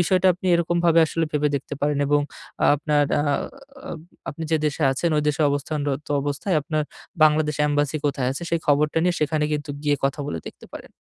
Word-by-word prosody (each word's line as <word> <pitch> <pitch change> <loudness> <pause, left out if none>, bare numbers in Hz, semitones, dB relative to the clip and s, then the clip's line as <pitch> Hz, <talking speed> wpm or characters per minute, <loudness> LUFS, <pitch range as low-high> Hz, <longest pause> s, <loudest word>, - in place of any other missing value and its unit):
বিষয়টা 185 +2 +2
আপনি 180 +2 -7
এরকমভাবে 170 0 +2
আসলে 165 +1 -1
ভেবে 150 0 +2
দেখতে 140 +1 -6
পারেন 145 0 +1
এবং 145 +1 +3 0.5
আপনার 150 0 +1 0.2
আ - - +1 1.1
আপনি 160 +3 -8
যে 160 - +4
দেশে 150 +2 -2
আছেন, 165 +5 -1
ঐ - - +3
দেশে 150 +1 0
অবস্থানরত 145 0 -2
অবস্থায় 145 +5 -1
আপনার 155 +1 -1 0.4
বাংলাদেশ 150 -1 +3
এম্বাসি 145 +1 0
কোথায় 135 -3 0
আছে? 140 - -6
সেই 170 -1 +1
খবরটা 150 +2 +2
নিয়ে 180 - +2
সেখানে 150 0 +1
কিন্তু 150 0 -3
গিয়ে 145 -1 +2
কথা 140 +2 0
বলে 85 - -3
দেখতে - - -14
পারেন। - - -10
150 Hz, 180 wpm, -23 LUFS, 145-160 Hz, 1.1 s, যে